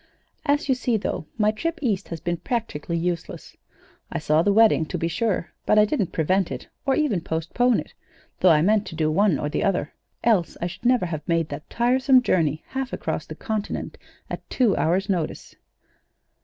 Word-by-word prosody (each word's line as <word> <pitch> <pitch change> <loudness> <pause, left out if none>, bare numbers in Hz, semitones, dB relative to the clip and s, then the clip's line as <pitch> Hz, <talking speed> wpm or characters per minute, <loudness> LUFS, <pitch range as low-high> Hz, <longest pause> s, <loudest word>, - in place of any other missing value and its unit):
As 290 +1 +2
you 265 - +4
see, 245 -2 0
though, 195 -6 -4
my 210 -1 +3
trip 330 +10 -3
East 210 - -1
has 165 - -6
been 175 +1 -2
practically 170 - -3
useless. 170 0 -4 0.6
I - - -2
saw 155 +1 +2
the 205 - +2
wedding, 220 -5 +5
to - - -3
be 165 - -1
sure, 195 -3 -1 0.2
but 215 - +4
I 210 - +7
didn't 210 - -1
prevent 185 +3 +1
it, - - -6 0.2
or 270 - +3
even 255 - +1
postpone 175 +10 +1
it - - -14 0.5
though 185 - +5
I 155 -2 +5
meant 210 +2 +2
to - - -7
do 155 -1 +1
one 195 -1 +3
or 145 - -2
the 150 - -1
other, 180 -6 0 0.3
else 210 -7 +2
I - - -2
should 180 +6 -7
never 245 -5 +3
have 160 -4 -4
made 165 -2 +1
that 145 +2 -7
tiresome 255 +2 +3
journey 160 - +1
half 265 -1 -3
across - - -3
the - - -7
continent 215 -2 -4 0.3
at - - -7
two 235 -7 +2
hours' 180 +5 +1
notice. 175 -6 -3
195 Hz, 195 wpm, -24 LUFS, 165-235 Hz, 0.6 s, I